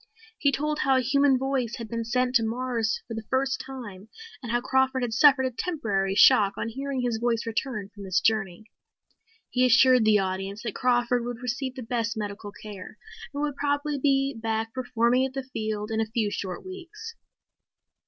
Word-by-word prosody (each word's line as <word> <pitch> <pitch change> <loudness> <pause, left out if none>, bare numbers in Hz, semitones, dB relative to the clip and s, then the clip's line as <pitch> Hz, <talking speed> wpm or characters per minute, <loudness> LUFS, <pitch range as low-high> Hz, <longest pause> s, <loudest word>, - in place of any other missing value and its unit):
He 280 - +3
told 300 +2 -1
how 270 -1 +3
a - - +3
human 275 +1 +3
voice 260 -2 -1
had 230 -2 -7
been 230 +1 -3
sent 250 +2 0
to 235 -2 +4
Mars 230 -1 -1
for 230 - -6
the 225 -1 -6
first 265 0 0
time 220 -7 -9 0.3
and 240 -3 -5
how 240 - +2
Crawford 265 +1 +1
had 235 -2 -2
suffered 270 +2 +5
a 260 - -1
temporary 210 - -1
shock 200 -1 +6
on 230 - -2
hearing 270 +2 -3
his 240 -3 -1
voice 235 -1 0
return 225 -3 -3
from 205 - -12
this 185 -2 +1
journey. 215 -2 0 0.9
He 255 - +2
assured 255 0 +6
the 215 -1 +5
audience 195 +1 -3
that 230 -4 -3
Crawford 245 -1 +1
would 240 0 -6
receive 255 +1 -3
the 255 - -6
best 230 -1 -2
medical 205 -1 -5
care 205 0 -10 0.3
and 290 0 -3
would 290 -2 -2
probably 290 0 -1
be 275 0 +2
back 225 0 -2
performing 245 0 +1
at 265 0 -2
the 270 0 -3
field 215 -4 -4
in 220 0 0
a 220 - -1
few 220 -3 0
short 185 - -5
weeks. 385 +5 -9
240 Hz, 190 wpm, -26 LUFS, 220-265 Hz, 0.9 s, shock